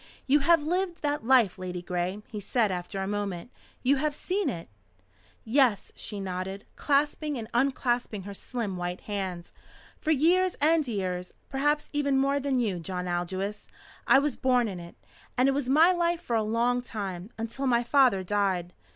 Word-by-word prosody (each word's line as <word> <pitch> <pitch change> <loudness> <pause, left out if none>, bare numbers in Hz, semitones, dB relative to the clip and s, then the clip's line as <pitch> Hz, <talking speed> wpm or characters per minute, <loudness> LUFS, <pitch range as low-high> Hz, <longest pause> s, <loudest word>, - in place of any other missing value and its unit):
"You 285 +3 +4
have 330 +2 +4
lived 355 +2 -1
that 290 -6 -1
life, 245 -9 +5
Ladygray?" 180 +2 -3
he 215 - -6
said 210 +1 +1
after 180 +1 -4
a - - -3
moment. 205 +1 -3 0.3
"You 275 +2 +4
have 300 +1 -1
seen 385 +5 -1
it?" 165 -1 -5 0.8
"Yes," 235 -4 +2
she 205 - -6
nodded, 190 +1 -4
clasping 295 0 +1
and 225 -2 -5
unclasping 240 -4 0
her 200 +1 -7
slim 210 -2 -4
white 175 +1 -4
hands. 190 -4 -5 0.5
"For - - -4
years 350 +5 +3
and 310 0 +3
years, 185 -5 -3 0.2
perhaps 295 +2 0
even 280 -2 +1
more 275 +1 +2
than 270 -2 0
you, 205 -7 0
John 180 +1 -4
Aldous! 185 +4 -3 0.4
I - - +7
was 285 -1 +1
born 250 -2 +2
in 190 -4 -5
it. 170 0 -11 0.4
And 255 +2 +4
it - - +4
was 275 -2 -1
my 315 +6 +6
life 345 -1 +1
for 235 - -1
a 225 - +3
long 235 +3 +1
time 195 -5 -5
until 230 +5 -3
my 240 -1 +3
father 245 -7 +4
died." 185 -3 0
235 Hz, 170 wpm, -28 LUFS, 190-280 Hz, 0.8 s, I